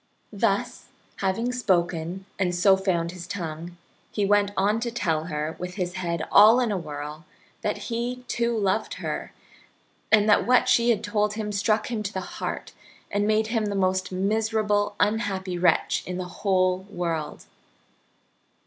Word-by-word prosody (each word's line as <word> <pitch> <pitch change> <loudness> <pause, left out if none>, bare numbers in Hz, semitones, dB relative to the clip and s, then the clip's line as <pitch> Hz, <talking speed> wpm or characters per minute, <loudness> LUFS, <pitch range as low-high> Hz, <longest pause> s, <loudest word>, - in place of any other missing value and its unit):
Thus, - - 0 0.3
having 200 +6 0
spoken, 180 -5 0
and 180 -2 +1
so 190 +2 +5
found 175 -3 0
his 175 -1 -9
tongue, 170 -2 -6 0.3
he 205 - 0
went 205 0 +3
on 205 +3 +2
to 235 +1 -2
tell 165 -9 -1
her, 155 -1 -3
with 180 0 -5
his 180 -3 -2
head 170 -3 -2
all 220 +4 +8
in 240 -3 +1
a 200 - 0
whirl, 150 -1 -7 0.4
that - - -1
he, 245 +1 -4
too, 235 -1 0
loved 200 +1 0
her, - - -4 0.8
and 215 -1 +5
that 210 - +4
what 250 0 +4
she 240 -1 +4
had 220 -2 +2
told 210 0 0
him 215 -1 -3
struck 210 +3 0
him 225 -3 -1
to 200 -1 -4
the 190 - -6
heart, - - -4 0.4
and 205 0 +1
made 215 0 +2
him 225 -2 +1
the 205 -1 -2
most 185 -1 0
miserable, 210 +1 0
unhappy 200 -4 0
wretch 180 - +2
in 180 0 -3
the 185 - -3
whole 185 -2 +2
world. 170 -6 -3
200 Hz, 160 wpm, -25 LUFS, 180-215 Hz, 0.8 s, all